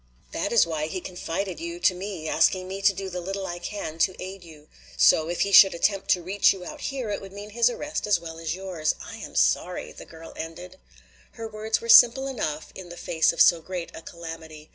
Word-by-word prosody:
That 200 - -2
is 235 - +5
why 155 -2 -3
he 185 +4 -4
confided 185 - -5
you 340 +1 -6
to - - +4
me, 180 -3 -6
asking 185 +4 +2
me 195 +1 -6
to 200 +1 +5
do 195 0 -6
the 180 -1 -5
little 195 +2 -4
I 175 -1 -5
can 175 -3 -6
to 185 +2 +2
aid 190 0 -8
you. 155 -3 -15 0.3
So 160 +1 +4
if 175 - -2
he 200 - +1
should 195 -2 +8
attempt 195 +3 0
to 180 - +2
reach 195 +3 +3
you 185 -2 -10
out 305 +6 -9
here, 260 -6 -4
it 205 - -3
would 195 -1 -10
mean 205 +2 -9
his 235 +2 +3
arrest 295 0 -4
as 200 -4 +3
well 165 -1 -9
as 165 0 -3
yours. 180 -5 -2
I - - -9
am - - -10
sorry," - - +1
the - - -12
girl 165 0 -12
ended. 175 +3 -8 0.5
Her 225 -1 -7
words 220 0 -2
were 230 - -7
simple 245 +3 +8
enough 160 - -4
in 185 -2 -10
the 175 - -10
face 160 -1 +1
of 170 - -1
so 170 -1 +6
great 180 0 -6
a - - -9
calamity. 160 -2 -10
185 Hz, 230 wpm, -25 LUFS, 165-205 Hz, 0.5 s, should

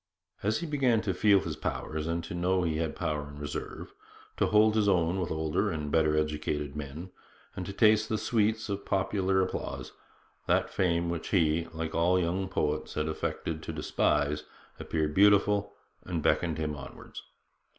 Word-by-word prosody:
As 110 +9 0
he - - -3
began 135 -7 +2
to 100 -4 -1
feel 100 +1 +4
his 80 -4 -4
powers, 80 0 -3
and 85 +1 -1
to 85 - -7
know 90 +1 +1
that 85 - +1
he 80 - -2
had 80 -1 -2
power 75 -4 -2
in 70 - -11
reserve; 75 0 -6 0.4
to - - +2
hold 105 0 +5
his 105 -2 +3
own 90 0 +2
with 90 - -2
older 80 +6 0
and 75 -5 -3
better 75 -1 +3
educated 75 -1 -2
men; 75 +5 -7 0.4
and 90 - -5
to - - -4
taste 110 +1 +4
the 110 - +1
sweets 110 0 +1
of 100 -1 -3
popular 95 0 +1
applause, 95 - -4 0.6
that - - +2
fame 85 -2 +1
which 85 -2 -4
he, 85 -3 +2
like 80 0 -4
all 90 +3 +3
young 90 +2 -1
poets, 75 -2 -1
had 75 0 -1
affected 80 0 -3
to - - -5
despise 75 +1 0 0.4
appeared 75 -2 -1
beautiful 100 +1 +4 0.3
and 85 -4 -3
beckoned 85 -3 +2
him 75 -1 -2
onwards. 70 -2 -10
85 Hz, 175 wpm, -29 LUFS, 75-100 Hz, 0.6 s, hold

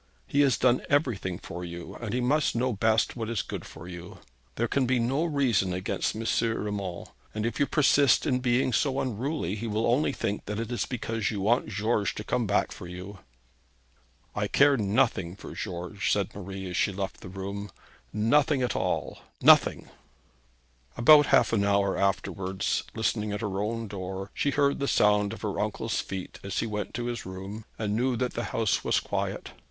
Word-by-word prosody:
He 140 - +2
has 140 -3 +4
done 125 0 +3
everything 120 - +1
for 90 0 -7
you, 85 0 -7
and 115 -4 -4
he 125 - 0
must 145 +3 +2
know 125 +1 +1
best 110 +1 +2
what 115 -2 -4
is 115 -3 -1
good - - -6
for 80 +2 -11
you. 90 0 -9 0.4
There 120 - 0
can 130 0 +1
be 130 0 +2
no 130 +7 +1
reason 125 - +1
against 95 +3 -2
M. 110 - -4 0.2
Urmand, 105 -5 -3 0.2
and 110 0 -1
if 115 0 -2
you 140 - +3
persist 140 -3 +4
in 130 -4 +1
being 125 0 +1
so 135 +1 +1
unruly, 125 - -2
he 110 +2 -4
will 110 +1 0
only 125 +6 +2
think 105 -6 -3
that 105 +1 -3
it 115 +1 -4
is 120 - -1
because 115 -3 -2
you 105 - -3
want 115 +6 +2
George 105 0 0
to 105 - -5
come 120 +1 0
back 100 - +1
for 90 - -8
you.' 90 +2 -8 1.1
'I - - -1
care 140 0 +5
nothing 100 -5 +1
for - - -10
George,' 95 +1 -3
said 100 -2 0
Marie, 95 -1 -6
as - - -4
she 100 - +2
left 95 0 -5
the 90 - -9
room; 100 +2 -5 0.4
'nothing 130 +6 +2
at 125 - -1
all - - -1 0.2
nothing.' - - +5 1.1
About 145 +4 +7
half - - +4
an 100 -3 +3
hour 100 -1 +2
afterwards, 95 0 -1
listening 110 -2 0
at 105 - -3
her 100 -3 -2
own 115 +2 -2
door, 95 0 -6
she 145 - 0
heard 140 0 +2
the 140 - -1
sound 105 -3 +3
of 115 - -8
her 105 -2 -2
uncle's 105 +2 -1
feet 95 -1 -7
as 100 -1 -4
he - - +1
went 105 -2 -4
to 120 +1 -3
his 120 -2 -3
room, 95 +4 -7
and 105 -1 -1
knew 125 +2 +1
that 125 +1 -1
the 120 - -3
house 110 -3 0
was - - +2
quiet. - - -3
110 Hz, 190 wpm, -28 LUFS, 100-125 Hz, 1.1 s, About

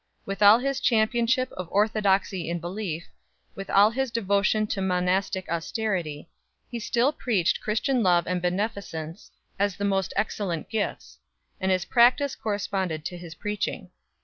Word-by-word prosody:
With 195 +1 -5
all 205 +2 +9
his 275 +2 -1
championship 235 +2 +2
of 180 -2 -7
orthodoxy 200 -4 +1
in 170 - -1
belief, 175 -1 -4 0.5
with 195 0 -8
all 205 +2 +5
his 265 +2 -1
devotion 210 -1 +1
to 205 -2 -3
monastic 185 +1 0
austerity, 170 -3 -2 0.4
he 240 - -4
still 235 +4 +1
preached 220 - 0
Christian 240 +4 0
love 175 -4 +3
and 180 0 -1
beneficence 180 -3 -3 0.3
as 200 -2 +1
the 200 - -3
most 195 -2 0
excellent 195 -5 -2
gifts; 220 -2 -3 0.4
and 190 0 0
his 185 -1 +1
practice 250 +3 +4
corresponded 190 -6 -2
to 180 - -4
his 170 -2 -9
preaching. 210 +4 -4
200 Hz, 145 wpm, -26 LUFS, 180-220 Hz, 0.5 s, all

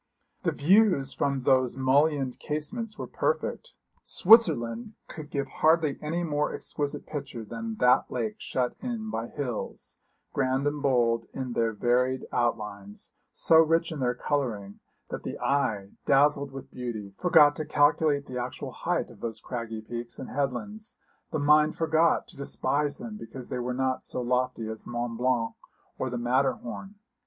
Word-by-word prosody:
The - - +1
views 180 -4 +3
from 140 -2 -1
those 130 -1 +3
mullioned 135 0 +2
casements 210 +9 -4
were - - -4
perfect. - - -2 0.3
Switzerland 165 - +4
could 155 -2 -9
give 140 -1 -1
hardly 155 +1 +2
any 165 +3 -2
more 150 -2 0
exquisite 145 -1 -3
picture 140 -6 -6
than 115 +1 -5
that 125 +3 +4
lake 110 -4 -3
shut 125 -1 -1
in 230 -3 -4
by 115 +1 -3
hills, 125 -5 -5 0.3
grand 135 0 +1
and 145 0 -1
bold 120 -4 +2
in 130 -2 -3
their 115 -1 +1
varied 125 +4 +1
outlines, 105 -4 -2 0.2
so 160 - +3
rich 165 +1 +3
in 155 - -5
their 125 -1 +1
colouring 115 -9 -2 0.3
that - - -4
the - - -5
eye, 105 -8 0 0.2
dazzled 140 0 +4
with 135 0 -9
beauty, 110 -6 -5
forgot 150 -4 +6
to 155 - -2
calculate 145 -1 +3
the 125 -1 -5
actual 125 +1 -5
height - - -2
of - - -16
those 115 -2 -4
craggy 115 -2 -5
peaks 120 +2 -7
and - - -7
headlands, 205 - -3 0.3
the 155 - 0
mind 150 +1 +4
forgot 160 0 +2
to - - -17
despise 140 +1 -1
them 215 0 -7
because 130 - -9
they 125 - -3
were 125 +1 -2
not 130 0 0
so - - -5
lofty 125 -2 0
as 110 0 -7
Mont 120 -1 -3
Blanc 125 -2 +1 0.5
or 130 - -1
the 125 - -3
Matterhorn. 130 - -1
135 Hz, 155 wpm, -28 LUFS, 120-150 Hz, 0.5 s, forgot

